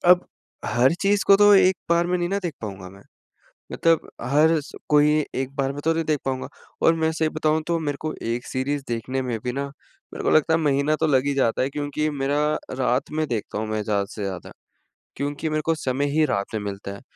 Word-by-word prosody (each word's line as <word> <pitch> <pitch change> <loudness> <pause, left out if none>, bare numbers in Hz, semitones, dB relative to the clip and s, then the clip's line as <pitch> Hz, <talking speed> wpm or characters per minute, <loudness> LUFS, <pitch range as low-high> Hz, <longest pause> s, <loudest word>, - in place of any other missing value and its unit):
अब 180 0 +5 0.4
हर 125 +6 +3
चीज़ 200 0 +2
को 195 - +8
तो 205 0 +7
1 190 -1 +5
बार 170 0 +3
में 180 0 +1
नी 175 - -1
ना 200 +2 0
देख 175 - -2
पाऊँगा 95 -3 -6
मैं। 100 +1 -15 0.7
मतलब 165 -1 +2
हर 150 +6 +3
स 140 - -12 0.2
कोई 150 0 +4
1 135 +1 -3
बार 135 -1 0
में 145 - -6
तो 165 - +3
नहीं 165 0 -1
देख 150 -2 +1
पाऊँगा 130 -1 -2 0.4
और 165 - +6
मैं 160 -1 +1
सही 160 0 0
बताऊँ 155 0 0
तो 170 -1 +1
मेरे 145 -3 -2
को 155 0 -3
1 120 +2 -3
सीरीज़ 140 +2 -2
देखने 125 +3 -2
में 120 -3 -2
भी 125 - -1
ना 140 +2 -3 0.5
मेरे - - -6
को - - +2
लगता 155 +1 +4
है - - +3
महीना 145 0 +2
तो - - +3
लग 135 -3 +3
ही 145 - +1
जाता 130 -3 +1
है 130 - +1
क्योंकि 145 +1 -2
मेरा 140 +2 +1 0.4
रात 125 0 0
में 155 0 0
देखता 110 -3 -3
हूँ 110 - -2
मैं 110 0 -1
ज़्यादा 100 -2 0
से 105 - -7
ज़्यादा 95 -3 -6 0.6
क्योंकि 145 +3 -3
मेरे 155 0 0
को 165 - +2
समय 135 -1 -1
ही 155 +1 +3
रात 100 -8 -1
में 105 - -2
मिलता 100 -1 -5
है। - - -12
145 Hz, 230 wpm, -23 LUFS, 125-160 Hz, 0.7 s, को